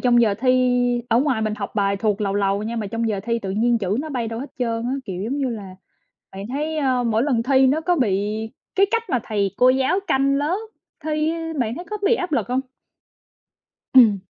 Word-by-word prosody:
trong 240 Hz, -1 st, +4 dB
giờ 210 Hz, -3 st, +2 dB
thi 250 Hz, -1 st, +2 dB
ở 235 Hz, 0 st, +3 dB
ngoài 260 Hz, -6 st, +1 dB
mình 215 Hz, -1 st, -1 dB
học 205 Hz, -2 st, -6 dB
bài 200 Hz, -1 st, +1 dB
thuộc 210 Hz, 0 st, 0 dB
làu 200 Hz, -1 st, -1 dB
làu 200 Hz, 0 st, +1 dB
nha 230 Hz, +2 st, -4 dB
mà 215 Hz, -2 st, -2 dB
trong 230 Hz, +2 st, -2 dB
giờ 205 Hz, -3 st, -1 dB
thi 230 Hz, 0 st, 0 dB
tự 195 Hz, -4 st, -5 dB
nhiên 230 Hz, +4 st, +2 dB
chữ 195 Hz, 0 st, -1 dB
nó 310 Hz, -, -5 dB
bay 240 Hz, -5 st, -2 dB
đâu 225 Hz, +1 st, -5 dB
hết 280 Hz, -, -7 dB
trơn 230 Hz, -2 st, -1 dB
á, 250 Hz, -, -1 dB
kiểu 185 Hz, -1 st, -5 dB
giống 265 Hz, +6 st, -2 dB
như 270 Hz, -2 st, 0 dB
là, 200 Hz, -5 st, -7 dB, 0.6 s
bạn 195 Hz, +1 st, -7 dB
thấy, 300 Hz, +5 st, -3 dB
ơ, 260 Hz, -4 st, +1 dB
mỗi 225 Hz, 0 st, +1 dB
lần 250 Hz, -5 st, +1 dB
thi 265 Hz, +1 st, +4 dB
nó 305 Hz, +4 st, +1 dB
có 355 Hz, +2 st, +1 dB
bị 210 Hz, -, +1 dB, 0.6 s
cái 395 Hz, -, +5 dB
cách 460 Hz, 0 st, +1 dB
mà 250 Hz, -, +1 dB
thầy 200 Hz, -3 st, -1 dB
cô 250 Hz, -, +6 dB
giáo 265 Hz, +9 st, +2 dB
canh 275 Hz, +1 st, +2 dB
lớp 295 Hz, +6 st, 0 dB, 0.5 s
thi, 310 Hz, +1 st, 0 dB, 0.3 s
bạn 235 Hz, -1 st, -1 dB
thấy 350 Hz, -, -7 dB
có 425 Hz, -, -2 dB
bị 460 Hz, +3 st, +4 dB
áp 360 Hz, -5 st, -4 dB
lực 235 Hz, -8 st, 0 dB
hông? 255 Hz, +1 st, +1 dB, 1.3 s
Ừm. 225 Hz, -6 st, +7 dB
240 Hz, 230 wpm, -22 LUFS, 215-275 Hz, 1.3 s, Ừm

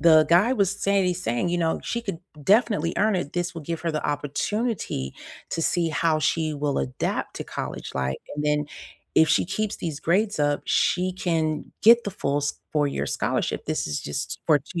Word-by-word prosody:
the 160 Hz, -2 st, +7 dB
guy 185 Hz, +9 st, +5 dB
was 200 Hz, -7 st, +2 dB
saying 200 Hz, -1 st, +3 dB
he's 180 Hz, 0 st, -1 dB
saying, 120 Hz, +9 st, 0 dB
you 175 Hz, -, +1 dB
know, 165 Hz, -1 st, +1 dB
"She 235 Hz, -, -2 dB
could 195 Hz, -7 st, -4 dB, 0.2 s
definitely 200 Hz, -, +3 dB
earn 215 Hz, 0 st, +3 dB
it. 160 Hz, -5 st, -3 dB
This 175 Hz, -1 st, -1 dB
will 165 Hz, -, -6 dB
give 165 Hz, +2 st, -4 dB
her 165 Hz, -2 st, -1 dB
the 155 Hz, -, -2 dB
opportunity 145 Hz, -, -2 dB, 0.4 s
to 165 Hz, -, -1 dB
see 170 Hz, +1 st, +1 dB
how 155 Hz, 0 st, +2 dB
she 155 Hz, +1 st, +1 dB
will 145 Hz, -1 st, -1 dB
adapt 65 Hz, -1 st, -2 dB
to -, -, -4 dB
college -, -, -5 dB
life, 65 Hz, 0 st, -1 dB, 0.2 s
and 150 Hz, 0 st, -3 dB
then 150 Hz, 0 st, +2 dB, 0.5 s
if 160 Hz, -1 st, +6 dB
she -, -, +3 dB
keeps 205 Hz, +3 st, -2 dB
these 155 Hz, -4 st, -4 dB
grades 200 Hz, +4 st, +1 dB
up, 145 Hz, 0 st, +1 dB
she 185 Hz, +1 st, +2 dB
can 160 Hz, -4 st, -1 dB, 0.2 s
get 235 Hz, +2 st, +7 dB
the 205 Hz, -, -2 dB
full 145 Hz, -7 st, -1 dB
s 145 Hz, 0 st, -1 dB, 0.2 s
four-year 145 Hz, -2 st, +1 dB
scholarship, -, -, -1 dB
this -, -, -1 dB
is 75 Hz, -, -2 dB
just 75 Hz, -, -4 dB
for 150 Hz, -2 st, +5 dB
2 170 Hz, +5 st, -6 dB
165 Hz, 200 wpm, -25 LUFS, 150-190 Hz, 0.5 s, the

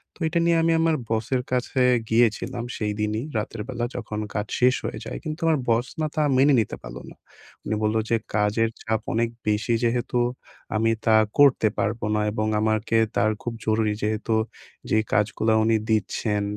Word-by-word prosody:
তো -, -, -22 dB
এটা 170 Hz, +2 st, 0 dB
নিয়ে 170 Hz, -1 st, +3 dB
আমি 165 Hz, -, +3 dB
আমার 165 Hz, -1 st, +3 dB
বসের 115 Hz, +3 st, 0 dB
কাছে 125 Hz, +1 st, 0 dB, 0.3 s
গিয়েছিলাম, 115 Hz, +1 st, +1 dB
সেইদিনই 105 Hz, +1 st, -2 dB
রাতের 105 Hz, +1 st, -4 dB
বেলা 120 Hz, -2 st, -2 dB
যখন 105 Hz, 0 st, -4 dB
কাজ 105 Hz, 0 st, -2 dB
শেষ 125 Hz, +1 st, +4 dB
হয়ে 110 Hz, -, -4 dB
যায়, -, -, -5 dB
কিন্তু 155 Hz, 0 st, -5 dB
আমার 160 Hz, -3 st, +3 dB
বস 115 Hz, +2 st, +2 dB
না 155 Hz, -, +1 dB
তা 155 Hz, -, +2 dB
মেনে 140 Hz, +2 st, +5 dB
নিতে 110 Hz, -, -1 dB
পারল -, -, -9 dB
না। -, -, -14 dB, 0.5 s
উনি 110 Hz, -, -1 dB
বলল 110 Hz, +1 st, +1 dB
যে, 115 Hz, -, +3 dB, 0.2 s
"কাজের 105 Hz, +2 st, +2 dB
চাপ 110 Hz, -1 st, -1 dB
অনেক 115 Hz, +1 st, +1 dB, 0.2 s
বেশি 105 Hz, +2 st, +1 dB
যেহেতু, 120 Hz, +1 st, 0 dB, 0.6 s
আমি 115 Hz, +1 st, +2 dB
তা 110 Hz, -1 st, +5 dB, 0.2 s
করতে 140 Hz, -6 st, +5 dB
পারবো 110 Hz, 0 st, -1 dB
না।" 105 Hz, -, +1 dB
এবং 110 Hz, 0 st, -1 dB
আমাকে 110 Hz, +1 st, +1 dB, 0.2 s
তার 110 Hz, -, +3 dB
খুব 120 Hz, -, -3 dB
জরুরি 110 Hz, -1 st, +1 dB
যেহেতু 110 Hz, +1 st, 0 dB, 0.6 s
যে -, -, +4 dB, 0.2 s
কাজগুলা 110 Hz, +1 st, +2 dB
উনি 110 Hz, 0 st, +3 dB
দিচ্ছেন, 105 Hz, 0 st, 0 dB
110 Hz, 175 wpm, -24 LUFS, 110-125 Hz, 0.6 s, মেনে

